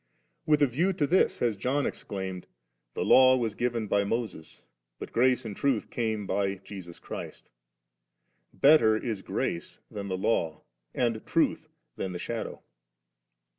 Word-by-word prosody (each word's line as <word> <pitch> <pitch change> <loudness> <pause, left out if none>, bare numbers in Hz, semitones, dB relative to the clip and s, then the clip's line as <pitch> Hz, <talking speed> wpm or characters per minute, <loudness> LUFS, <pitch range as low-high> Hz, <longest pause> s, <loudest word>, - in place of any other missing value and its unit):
With 150 -1 +4
a - - +8
view 165 +10 +1
to 150 - +1
this 180 +6 +3
has 115 -3 +1
John 130 +8 0
exclaimed, 95 -2 -5 0.2
* - - -52
The - - -1
law 130 0 +7
was 115 -4 -1
given 120 0 -1
by 100 -1 +2
Moses, 100 -6 -4 0.3
but - - -8
grace 125 +1 +3
and 105 -3 -5
truth 135 -3 0
came 110 -3 -1
by 100 0 0
Jesus 95 -3 -10
Christ^.' - - -8 1.0
Better 135 -7 +5
is 110 -4 -3
grace 85 -2 -3
than 100 -1 -5
the 95 -1 -2
Law, 85 -5 0 0.3
and 115 -3 0
truth - - +1 0.3
than 95 - -3
the - - -3
shadow. 115 +6 -5
110 Hz, 150 wpm, -28 LUFS, 95-125 Hz, 1.0 s, a